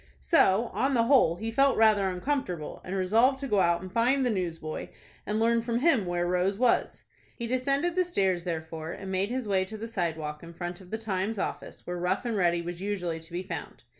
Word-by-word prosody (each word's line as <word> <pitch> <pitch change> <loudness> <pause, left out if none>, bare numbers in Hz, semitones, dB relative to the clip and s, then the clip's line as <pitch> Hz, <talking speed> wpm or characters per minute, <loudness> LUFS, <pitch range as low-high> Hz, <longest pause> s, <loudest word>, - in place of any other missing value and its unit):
So, 230 - +3
on 270 +1 +1
the 230 - +4
whole, 235 - +4
he 220 +5 -4
felt 275 +3 +3
rather 215 -3 +4
uncomfortable, 180 - -3
and 185 - -4
resolved 225 +8 +3
to 275 0 -5
go 210 -5 +2
out 170 -1 +2
and 185 - -8
find 255 +4 +3
the 245 - +2
newsboy, 165 -5 -3 0.4
and 210 +1 0
learn 230 +1 +3
from 235 0 -1
him 255 - +3
where 175 0 0
Rose 180 +2 +1
was. 245 +1 +1 0.3
He 235 - -5
descended 275 +7 0
the 365 +1 +2
stairs, 190 - 0
therefore, 160 -1 -4
and 195 -1 -7
made 190 +2 0
his 250 -2 -3
way 190 -2 +2
to 220 +3 -8
the 225 +2 -5
sidewalk 160 -7 -3
in 170 0 -11
front 175 +1 -5
of 180 - -14
the 220 - -2
"Times" 210 0 -2
office, - - -5
where 180 0 -4
Rough 180 +7 -1
and 235 -2 -1
Ready 175 -3 +2
was 175 +1 -6
usually 180 -5 -2
to 165 +1 -16
be 175 +2 -3
found. 190 - -7
195 Hz, 220 wpm, -28 LUFS, 175-235 Hz, 0.4 s, the